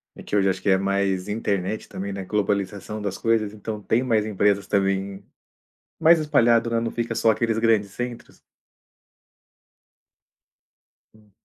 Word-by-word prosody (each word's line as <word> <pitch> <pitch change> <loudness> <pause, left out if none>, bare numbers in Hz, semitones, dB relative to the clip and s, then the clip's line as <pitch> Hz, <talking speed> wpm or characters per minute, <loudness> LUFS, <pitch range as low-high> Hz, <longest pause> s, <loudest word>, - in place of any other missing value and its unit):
E - - -11
que - - -4
hoje 100 -1 +3
acho 95 0 -2
que - - 0
é 95 - +5
mais 95 -1 0
internet 105 -1 -2
também, 100 +1 -5
né, 95 -1 -5
globalização 105 +1 -2
das 100 -2 -3
coisas, 110 -2 0
então 105 0 -6
tem 110 +4 +1
mais 110 -4 +1
empresas 100 -1 +1
também, 95 0 -1 0.8
mais 165 +1 +6
espalhado, 120 -6 +3
né, 115 0 +1
não 115 0 -2
fica 115 -1 -3
só 115 - +3
aqueles 110 +1 0
grandes 110 -3 +2
centros. 120 0 -7 2.7
Sim. 105 -1 -24
105 Hz, 145 wpm, -23 LUFS, 100-115 Hz, 2.7 s, mais